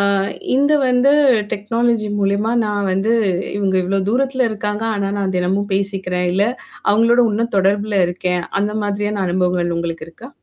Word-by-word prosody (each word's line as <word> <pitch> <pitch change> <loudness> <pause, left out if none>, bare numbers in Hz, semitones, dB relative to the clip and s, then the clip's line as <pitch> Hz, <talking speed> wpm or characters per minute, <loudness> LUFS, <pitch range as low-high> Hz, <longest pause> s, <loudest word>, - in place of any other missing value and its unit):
ஆ - - +3 0.5
இந்த 285 +3 +3 0.2
வந்து 250 +3 +3 0.4
டெக்னாலஜி 230 +1 0
மூலியமா 200 +2 0
நான் 205 -2 -1
வந்து 200 +5 +1 0.4
இவங்க 195 -2 0
இவ்ளோ 195 +2 0
தூரத்தில 260 0 +1
இருக்காங்க. 210 0 -3
ஆனா 200 -1 -1
நான் 190 -2 -2
தினமும் 190 +3 -1
பேசிக்கிறேன். 190 -2 -1
இல்ல 195 +3 +2 0.5
அவங்களோட 230 +3 +4
இன்னும் 230 +2 -2
தொடர்புல 200 +2 +1
இருக்கேன். 180 0 -2 0.2
அந்த 210 +1 -1
மாதிரியான 205 0 -2
அனுபவங்கள் 180 -1 0
உங்களுக்கு 165 -1 -4
இருக்கா? 230 +10 -12
200 Hz, 145 wpm, -18 LUFS, 190-220 Hz, 0.5 s, அவங்களோட